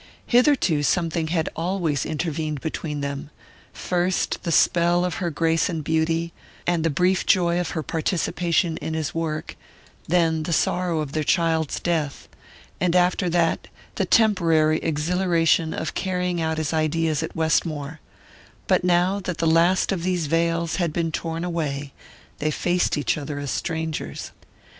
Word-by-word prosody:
Hitherto 245 - +3
something 165 +2 0
had 160 -1 0
always 165 -4 -1
intervened 155 -1 -2
between 150 0 -4
them 140 0 -4 0.4
first 180 +1 -1
the 170 - -3
spell 175 +2 +3
of 175 -5 -3
her 175 - 0
grace 165 0 +1
and 160 -3 -3
beauty, 165 +2 0 0.3
and 175 -2 +1
the 165 - +2
brief 180 +5 +2
joy 175 -2 +3
of 175 -2 -2
her 160 - -1
participation 170 0 0
in 160 - -4
his 155 -2 -2
work; 160 -2 -3 0.5
then 165 -1 +2
the 165 +2 -2
sorrow 175 -1 +1
of 145 -3 -5
their 155 +1 -1
child's 160 -2 +1
death, 160 -5 -2 0.5
and 180 -1 +1
after 180 +1 +2
that 165 -1 +1 0.3
the - - -1
temporary 165 -8 +3
exhilaration 165 +1 +1
of 160 - -3
carrying 180 -2 -1
out 160 0 -1
his 160 0 -2
ideas 160 0 +1
at 160 - -5
Westmore 160 -2 0 0.7
but - - +2
now 180 +2 +2
that 180 -3 -4
the 165 - -1
last 170 +3 +3
of 190 -3 -1
these 180 -2 0
veils 165 +1 0
had 170 -3 0
been 165 0 -1
torn 165 +1 -3
away 145 -5 -3 0.5
they 155 - 0
faced 175 +3 0
each 145 +1 0
other 145 0 -5
as 145 -1 -3
strangers. 160 -1 -4
165 Hz, 150 wpm, -23 LUFS, 155-175 Hz, 0.7 s, Hitherto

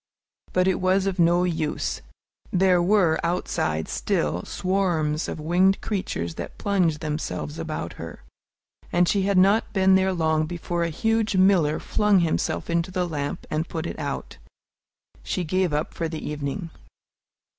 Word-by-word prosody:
But 185 0 +2
it 190 - +1
was 185 +1 +2
of 195 -2 -2
no 175 +1 +4
use. 160 -4 -2 0.5
There 180 -1 +4
were 175 -3 +3
outside 80 - -1
still 90 - -1
swarms 175 -5 0
of - - -5
winged 180 +5 +3
creatures 85 - -3
that - - -8
plunged 180 -7 +1
themselves 150 0 -4
about 155 - -4
her, 80 -6 -9 0.7
and 175 0 +3
she 200 - +2
had 200 - +2
not 200 +4 +4
been 190 -1 +4
there 190 0 +3
long 160 -3 +1
before 175 0 -3
a 170 - 0
huge 225 +5 0
miller 185 -5 +4
flung 210 -3 +2
himself 165 -2 -1
into 170 +1 0
the 180 -1 -1
lamp 145 -3 -4
and 155 +2 -1
put 160 -2 -4
it - - -5
out. 145 -2 -5 0.8
She 180 - -2
gave 185 +1 0
up 150 +1 -2
for 165 -1 -3
the 160 -1 -5
evening. 150 +4 -4
175 Hz, 155 wpm, -24 LUFS, 155-190 Hz, 0.8 s, no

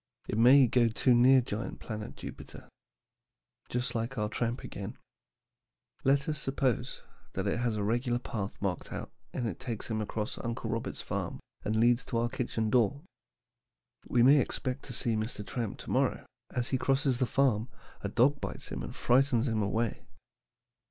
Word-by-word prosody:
It - - -2
may 130 +3 +8
go 120 0 +3
too 120 +3 +3
near 130 +2 +7
giant 110 -1 -4
planet 110 -2 -6
Jupiter. - - -9 1.0
Just 125 +1 -1
like 120 +2 -2
our 105 -1 0
tramp 120 +2 -2
again. - - -6 1.1
Let 140 +1 +3
us 150 -2 -1
suppose 135 -2 -1 0.3
he - - 0
has 120 -1 0
a 105 - -1
regular 120 +3 +1
path 105 -4 -5
marked 95 -3 -2
out - - -5 0.2
and 120 - -2
it 100 - -4
takes 120 -3 -5
him 110 -1 0
across 105 0 -3
Uncle 115 0 -3
Robert's - - -3
farm - - -3 0.2
and 110 - -1
leads 120 +3 +4
to 120 - -2
our 120 +1 +1
kitchen 115 -3 -1
door. 125 +4 +2 1.0
We 120 -1 +3
may 140 +3 +7
expect 130 0 -2
to 125 - -7
see 115 0 0
Mr. 110 -1 -3
Tramp 115 -3 -3
to - - -6
morrow, - - +1 0.2
but - - -11
as 120 0 +1
he 130 - +1
crosses 135 -2 +2
the 130 - +2
farm 120 -2 +2 0.3
a - - -1
dog 140 +4 +3
bites - - -5
him - - -4
and - - -6
frightens 125 -1 +3
him 110 -2 +1
away. 110 +3 0
120 Hz, 170 wpm, -31 LUFS, 110-130 Hz, 1.1 s, may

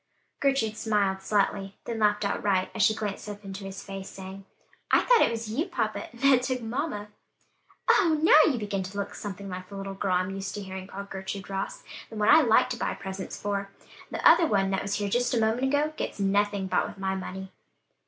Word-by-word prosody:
Gertrude 270 -6 +1
smiled 200 -3 +1
slightly, 195 -1 0
then 230 -1 -3
laughed 210 -1 +2
outright, 195 -2 0
as 225 - -2
she 215 +2 +5
glanced 210 -1 -4
up 205 0 -8
into 195 0 -7
his 195 0 -7
face, 195 0 -7
saying, 190 0 -9 0.4
"I - - +5
thought - - +5
it - - +5
was 230 -1 -4
you, 300 - -1
papa, 215 - -2
that 260 +1 +4
took 255 -1 -2
mamma." 225 -3 -3 0.8
"Oh! 325 -5 +4
now, 310 0 +7
you 260 - -2
begin 205 -3 -2
to 190 +2 -7
look 200 0 -3
something 200 -1 -6
like 185 -1 -7
the 200 - -9
little 195 0 -5
girl 195 -1 -1
I'm 185 +1 +1
used 195 0 -5
to 205 - -4
hearing 190 0 -7
called 200 0 -8
Gertrude 190 0 -6
Ross; 195 0 -4 0.3
the - - -10
one 210 -1 +2
I 315 +2 +8
like 230 -6 +4
to 245 - -2
buy - - -2
presents 190 -1 -6
for; 200 -1 -2 0.4
the - - +2
other 335 - +7
one 195 -4 +1
that 195 - 0
was 200 - -2
here 205 - -1
just 245 +4 +1
a - - +2
moment 225 +4 +1
ago, 290 +3 +1
gets - - -4
nothing 200 0 +1
bought 190 - +1
with - - -10
my 190 0 -1
money." 190 0 -6
205 Hz, 215 wpm, -27 LUFS, 195-230 Hz, 0.8 s, I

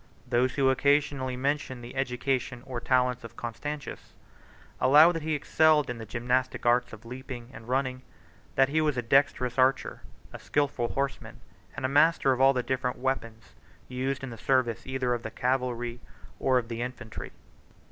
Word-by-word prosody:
Those 125 0 +1
who 135 -2 +2
occasionally 140 -2 +1
mention 135 -2 -2
the 120 +2 -10
education 130 -1 -2
or 125 -3 -4
talents 125 0 +1
of 115 0 -11
Constantius, 145 +5 -6 0.6
allow 150 +5 +7
that 165 -2 -4
he 155 0 -1
excelled 150 -2 +3
in 120 - -7
the 110 - -8
gymnastic 125 +3 -1
arts 120 +1 +3
of 110 +1 -12
leaping 125 0 -8
and 115 -1 -11
running 130 0 -1 0.5
that 135 0 +4
he 155 +2 +2
was 150 -4 0
a 125 - -1
dexterous 125 0 +2
archer, 130 +1 +2 0.3
a - - -7
skilful 140 -4 0
horseman, 140 0 -3 0.4
and - - -3
a - - +3
master 145 0 +4
of 130 0 0
all 135 0 +7
the 125 -2 -1
different 125 0 -2
weapons 115 -4 -4 0.3
used 130 +2 -3
in 135 - -5
the 115 - -9
service 130 -3 0
either 130 -2 0
of 120 - -2
the - - -5
cavalry 125 -2 -2 0.4
or 130 -1 +3
of 120 -2 -1
the 115 0 -5
infantry. 125 -2 -6
130 Hz, 170 wpm, -28 LUFS, 120-135 Hz, 0.6 s, allow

